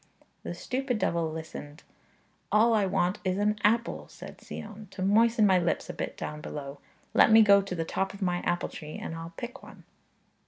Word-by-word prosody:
The - - -6
stupid 255 -2 -2
devil 170 -5 0
listened. 155 -1 -8 0.7
'All 225 +2 +5
I 210 -3 +3
want 180 0 0
is 185 0 0
an 210 +1 +1
apple,' 230 +3 +1
said - - -11
Sion, 215 0 -9
'to 185 - -5
moisten 225 +3 +4
my 190 -2 +5
lips 175 -1 -1
a - - -11
bit - - -5
down 150 0 -5
below; 140 -2 -7 0.3
let - - +6
me 220 0 +9
go 200 -1 +6
to 195 -2 -5
the 165 -1 -2
top 190 +3 -1
of - - -11
my 180 -3 0
apple 175 0 -1
tree, 155 -1 -8
and - - -5
I'll 165 +1 -7
pick 245 +2 -7
one.' - - -14
195 Hz, 195 wpm, -28 LUFS, 165-215 Hz, 0.7 s, me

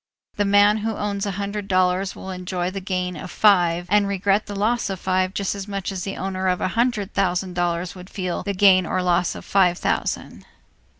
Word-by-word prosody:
The 205 - +1
man 205 +1 +5
who 220 0 -2
owns 200 -1 -2
a - - -1
hundred 200 0 -4
dollars 185 0 +1
will 190 - -7
enjoy 180 -1 -3
the 195 - -4
gain 180 -1 -2
of 180 +3 -7
five 175 -4 +3
and 205 +2 +3
regret 200 +1 +1
the 205 - -6
loss 220 +3 0
of 190 -2 -4
five 185 0 0
just 200 -2 -1
as 200 -1 -6
much 200 -1 -3
as 190 -2 -4
the 195 - -5
owner 190 0 -2
of 180 -1 +1
a - - 0
hundred 230 -2 0
thousand 185 -1 0
dollars 175 0 -1
would 185 0 -12
feel 185 -3 -3
the 200 -1 -3
gain 185 -2 +5
or 185 - -1
loss 175 0 +1
of - - -9
five 180 -3 +3
thousand. - - -2
190 Hz, 215 wpm, -22 LUFS, 180-200 Hz, -, man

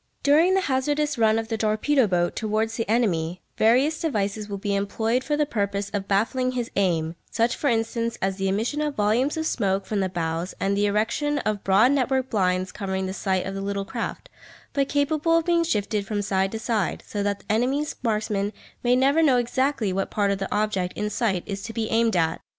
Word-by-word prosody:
During 320 +6 +5
the 385 - +3
hazardous 290 0 0
run 220 -1 +4
of 225 0 -2
the 225 -1 -2
torpedo 220 +4 +2
boat 175 -2 0
towards 220 +1 -1
the 225 -3 -3
enemy, 180 -7 0
various 260 +8 +3
devices 210 -8 -2
will 200 - -3
be 200 +1 -2
employed 220 +5 0
for 295 +1 -1
the 300 - +2
purpose 200 -5 -2
of 200 -1 -3
baffling 255 +6 +1
his 245 -1 -3
aim, 165 -5 +1 0.2
such 230 +1 +1
for 290 - -2
instance 230 -1 0
as 190 0 -1
the 195 -1 -1
emission 225 +10 -1
of 300 -2 -2
volumes 225 +9 +1
of 320 - -1
smoke 195 -8 0
from 210 - -2
the 190 -1 0
bows 170 0 -3
and 195 +1 +1
the 205 +1 +2
erection 230 +8 0
of 215 -7 -2
broad 200 +7 +5
network 265 -1 0
blinds 185 -3 +1
covering 190 -1 -3
the 190 - -3
sight 190 -2 -1
of 195 - -4
the 195 - -4
little 200 0 -2
craft, - - -5 0.5
but 275 -1 0
capable 310 +3 +2
of 330 - 0
being 340 -1 +3
shifted 210 -8 -1
from 205 -1 -1
side 195 -1 0
to - - -2
side, 220 -5 -1
so 205 - -4
that 200 0 -1
the - - -5
enemy's 265 +7 0
marksmen 210 -3 -1 0.3
may 245 0 +3
never 275 +5 +3
know 275 -6 +4
exactly 245 -3 0
what 195 +1 -1
part 205 -1 +1
of 195 - -1
the 195 - -4
object 205 -4 -1
in 210 0 -2
sight 200 -7 0
is 195 -1 -5
to 225 +2 -7
be 225 -1 -2
aimed 225 -1 +2
at. 165 -2 +1
215 Hz, 210 wpm, -24 LUFS, 195-255 Hz, 0.5 s, During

